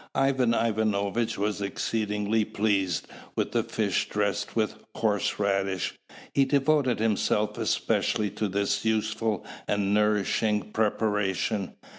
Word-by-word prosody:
Ivan 130 -4 +2
Ivanovitch 110 0 0
was 105 +1 -1
exceedingly 105 +1 0
pleased 100 -5 0 0.3
with - - -1
the - - +2
fish - - -1
dressed 100 -1 -1
with 110 -2 +1 0.2
horse 105 -3 0
radish. 100 -2 0 0.4
He 140 - +4
devoted 135 -2 +2
himself 105 -1 +1
especially 105 -2 +1
to 110 - -2
this 100 +1 0
useful 110 -1 0 0.2
and 100 -1 +1
nourishing 105 0 +1
preparation. 105 -2 0
105 Hz, 110 wpm, -27 LUFS, 100-110 Hz, 0.4 s, He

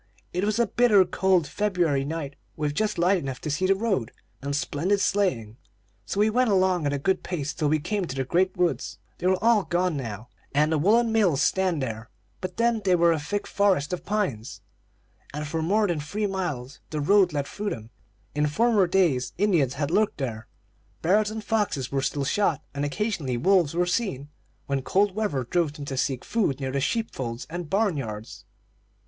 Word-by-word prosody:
It 180 +2 -1
was 215 +1 0
a 235 - +3
bitter 215 -4 +4
cold 180 -1 +2
February 175 -7 0
night, 145 -1 -4 0.2
with 150 -1 -1
just 210 +6 -1
light 180 +3 +3
enough 135 -4 -5
to 150 - -3
see 185 +6 0
the 195 - +4
road, 195 - -1 0.3
and 140 +1 -2
splendid 170 +7 0
sleighing; 130 - 0 0.5
so 200 - -2
we 210 - +5
went 250 +1 +2
along 185 -5 +2
at - - 0
a 145 - 0
good 185 +7 0
pace, 150 -5 -3
till 150 -3 0
we 155 - +3
came 185 +5 -2
to 135 - -6
the 135 - -1
great 180 +8 +1
woods. 175 -1 0 0.2
They 180 - 0
are 190 0 +3
all 230 -2 +5
gone 175 -1 0
now, 115 -3 -6 0.3
and 150 +2 +3
the 160 - +2
woollen 225 +7 +3
mills 185 -11 +3
stand 185 -6 +1
there, 115 -2 -5 0.3
but 185 -1 -6
then 230 -1 +2
they 185 -2 +4
were 170 -1 +4
a 160 - +1
thick 205 +8 -3
forest 190 -6 +1
of 180 - -4
pines, 165 - -2 0.7
and 150 0 -3
for 160 +2 -2
more 205 +7 +2
than 170 -4 -1
three 200 +9 -3
miles 160 -9 -3
the 155 - -3
road 185 +4 +4
led 145 -2 -1
through 205 +7 -4
them. 115 - -7 0.4
In 150 0 +1
former 215 +4 +3
days 160 -10 +1
Indians 170 -10 +2
had 145 +1 -2
lurked 210 +3 +2
there; 115 -4 -4 0.6
bears 205 +5 +3
and 220 0 -6
foxes 205 - -1
were 135 -1 0
still 140 +1 -1
shot, 160 -2 +1
and 140 0 -3
occasionally 145 - -2
wolves 175 +1 +3
were 175 +1 +2
seen, 175 - -2 0.4
when 140 -1 -1
cold 195 +7 +2
weather 200 -11 -1
drove 160 +4 0
them 145 -1 -8
to 140 - -4
seek 130 -1 -1
food 195 - 0
near 135 -1 -3
the 140 +1 -1
sheep 225 - -1
folds 120 -2 -5
and 175 -2 -5
barn 200 -4 +1
yards. 110 -4 -6
170 Hz, 200 wpm, -26 LUFS, 140-200 Hz, 0.7 s, we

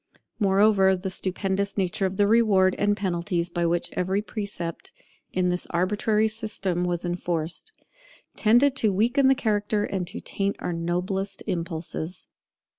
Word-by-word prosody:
Moreover, 195 -1 +4
the 190 +1 -3
stupendous 195 +2 -1
nature 190 0 0
of 190 0 -6
the 205 - +4
rewards 200 -4 +4
and 205 0 +2
penalties 175 -2 -1
by 170 -1 0
which 170 +1 -1
every 190 +3 0
precept 200 -7 -5 0.4
in 180 -1 +1
this 180 0 -2
arbitrary 210 +5 +1
system 210 -5 -2
was 175 0 -2
enforced, 175 - -3 0.6
tended 245 +5 +4
to 215 - +3
weaken 240 +8 +3
the 270 - +5
character 210 -2 0
and 190 -4 -3
to - - -3
taint 200 0 -2
our 175 - -3
noblest 180 +4 -2
impulses. 170 -1 -4
190 Hz, 140 wpm, -25 LUFS, 175-210 Hz, 0.6 s, the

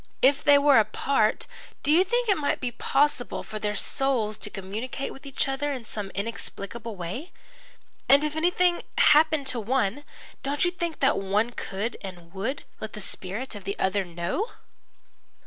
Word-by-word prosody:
If 275 +2 +5
they 285 -1 +7
were 280 -3 +6
apart, 215 +1 +1 0.4
do 290 - +2
you 340 +4 +6
think 480 +5 0
it 400 - +4
might 295 -4 0
be 250 -2 -2
possible 270 0 0
for 215 0 -6
their 210 0 -1
souls 225 -3 +1
to - - -3
communicate 210 +8 -5
with 270 +1 -12
each 275 +1 0
other 270 +2 -1
in 250 -4 -6
some 210 -2 -5
inexplicable 225 +1 -4
way? 190 - -6 0.8
And 280 +2 +7
if 300 0 -1
anything 350 +2 +2 0.2
happened 305 -1 +5
to 255 -3 +1
one, 245 +3 0 0.4
don't 285 +4 +1
you 350 - +2
think 340 -3 -4
that 270 - +5
that - - -2
one 205 +4 +1
could 215 0 -4
and 175 -3 -9
would 200 +9 -3 0.2
let 220 - -6
the 215 - -7
spirit 200 +5 -6
of 205 -2 -8
the 200 +1 -4
other 190 +1 +1
know?" 175 - -3
245 Hz, 175 wpm, -26 LUFS, 205-290 Hz, 0.8 s, they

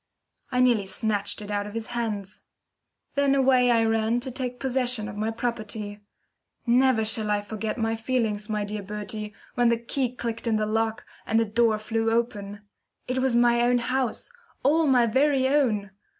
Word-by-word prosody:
I 250 0 +2
nearly 235 -6 +3
snatched 205 0 -1
it 205 - -7
out 205 0 -1
of 210 - -9
his 225 -1 -3
hands. 210 -4 -3 0.7
Then 280 -1 +2
away 260 -2 +4
I 230 -1 +4
ran 225 +1 +1
to 260 +1 -5
take 250 0 -4
possession 250 -4 -1
of 200 - -7
my 215 +2 -1
property. 215 -3 -4 0.7
Never 245 -2 +3
shall 215 -1 +1
I 205 0 +1
forget 215 +2 -4
my 225 -1 0
feelings, 225 -3 -1
my 210 -1 -1
dear 210 0 -4
Bertie, 210 +1 -5 0.2
when 245 -1 +3
the 235 - +2
key 250 +2 -2
clicked 230 -1 -4
in 225 - +2
the 215 0 +1
lock, 225 +1 -1 0.2
and 225 - +3
the 230 - +2
door 225 0 +2
flew 225 +1 -1
open. 210 -3 -2 0.5
It 255 +1 -1
was 260 -2 +1
my 240 0 +4
own 245 +1 +3
house 255 - -2 0.3
all 310 +4 +3
my 250 -3 +5
very 265 +3 +2
own! 230 -9 +1
225 Hz, 180 wpm, -26 LUFS, 215-250 Hz, 0.7 s, my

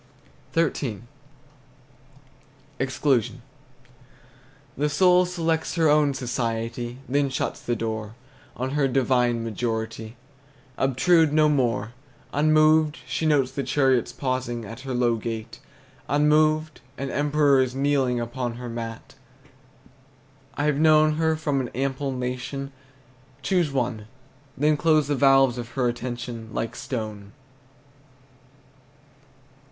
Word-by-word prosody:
XIII. 140 -9 0 1.8
EXCLUSION. 130 -2 0 1.3
The 150 +1 0
soul 180 +3 +4
selects 165 -3 -1
her 165 -3 +3
own 145 -2 +3
society, 120 -1 -3
Then 140 +1 +1
shuts 130 - -3
the 120 - -1
door; 110 -1 -4 0.4
On 130 +1 -2
her 145 -1 +2
divine 125 -3 +1
majority 115 0 -4 0.6
Obtrude 155 +5 +3
no 155 0 +5
more. 120 -5 0 0.4
Unmoved, 155 +1 +4
she 160 - -1
notes 140 -4 +2
the 140 - -3
chariot's 130 -2 +1
pausing 130 -3 -3
At 115 +4 -9
her 130 -1 -5
low 120 -2 +2
gate; 110 0 -6 0.5
Unmoved, 155 +1 +2 0.2
an 135 -1 -4
emperor 145 -1 +3
is 130 -1 -1
kneeling 135 -3 +1
Upon 120 0 -4
her 120 0 -7
mat. 115 0 -7 1.4
I've 145 0 +1
known 155 -1 +5
her 160 0 +2
from 145 -3 -1
an 125 - -4
ample 135 +1 -2
nation 130 +2 -4 0.7
Choose 175 0 +1
one; 120 -5 -2 0.5
Then 150 +2 +2
close 155 -2 +2
the 145 - +2
valves 135 -2 +4
of 120 -1 -6
her 130 -2 +1
attention 120 -1 -5
Like 115 - -3
stone. 105 -5 -6
130 Hz, 110 wpm, -24 LUFS, 120-150 Hz, 1.8 s, no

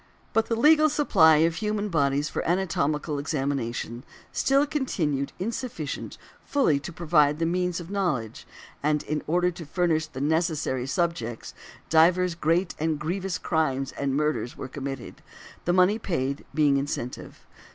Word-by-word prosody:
But 225 0 +2
the 230 - 0
legal 310 +5 +5
supply 190 - +5
of 165 0 -1
human 210 -1 -1
bodies 145 -3 +1
for - - -3
anatomical 170 -5 0
examination 135 -5 -3 0.3
still 275 +2 +3
continued 165 - -1
insufficient 210 - -4 0.3
fully 260 - +2
to 140 - -7
provide 155 -3 +2
the 165 - 0
means 180 +1 0
of 175 +2 -9
knowledge; 160 - -2 0.3
and 150 0 +1
in 150 0 -2
order 180 +3 +2
to 170 0 -9
furnish 160 0 0
the 130 - -8
necessary 155 -4 0
subjects, 135 -8 -2 0.4
divers 175 +2 +4
great 170 +2 +1
and 160 0 0
grievous 175 +3 -2
crimes 135 -5 -1
and 140 -1 -2
murders 150 -4 -1
were - - -5
committed, 135 -1 -7 0.4
the 175 - +2
money 185 +4 +4
paid, 140 -8 -2
being 145 -1 +3
the 140 - +3
incentive. 135 -3 -5
160 Hz, 145 wpm, -26 LUFS, 140-180 Hz, 0.4 s, legal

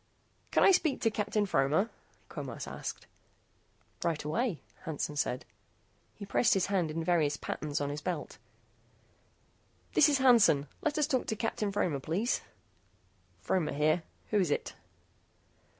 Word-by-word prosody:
"Can - - +3
I - - +8
speak 320 -6 +2
to 225 - +2
Captain 210 0 0
Fromer?" 160 +5 +2 0.4
Quemos - - -6
asked. - - -6 1.0
"Right 165 -3 -1
away," 190 - -1 0.2
Hansen 150 -3 -3
said. 130 -3 -1 0.7
He 205 - -8
pressed 200 +3 +3
his 190 - +2
hand 190 -5 0
in 165 +2 -3
various 160 -4 +2
patterns 150 0 -3
on 145 0 -2
his 145 +1 -5
belt. 160 -4 -4 1.5
"This - - +6
is 285 - +3
Hansen. 235 - +5 0.2
Let 305 -1 0
us 300 - +3
talk 265 -4 0
to 220 - -1
Captain 215 -2 -2
Fromer, 180 -8 0
please." 185 - -1 1.0
"Fromer 180 -5 0
here. 155 +4 +2 0.3
Who 210 - +3
is 180 -5 +2
it?" - - -1
180 Hz, 140 wpm, -31 LUFS, 150-220 Hz, 1.5 s, I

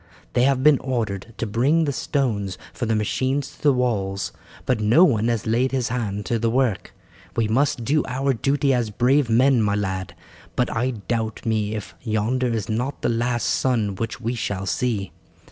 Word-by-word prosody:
They 125 - +3
have 135 -1 +2
been 150 -2 +6
ordered 115 -5 -3
to 115 - -2
bring 135 +10 +2
the 140 - -1
stones 110 -11 -1 0.2
for 120 - -3
the 110 - +1
machines 130 +6 -1
to - - -20
the 145 - +5
walls, 100 -7 -1 0.3
but 125 - +1
no 110 +11 +5
one 115 - +3
has 115 -3 -1
laid 120 +4 +1
his 130 -3 0
hand 105 -4 -3
to 115 - 0
the 115 +1 +1
work. 120 -4 0 0.4
We 115 -2 +1
must 120 +1 +1
do 150 +4 +2
our 135 +2 0
duty 135 +3 +1
as 120 -3 0
brave 125 +4 +2
men, 125 +2 +4
my 100 -1 +1
lad, 95 -3 -3 0.4
but - - 0
I 125 +3 +1
doubt 110 -1 -3
me 110 -1 0
if 95 -6 -6
yonder 115 +4 0
is 115 -4 -2
not 125 +6 -3
the - - +2
last 120 +1 0
sun 115 -6 +1
which 115 +4 -4
we 120 0 -2
shall 100 -5 -3
see. 100 +1 -1
115 Hz, 190 wpm, -23 LUFS, 105-130 Hz, 0.4 s, been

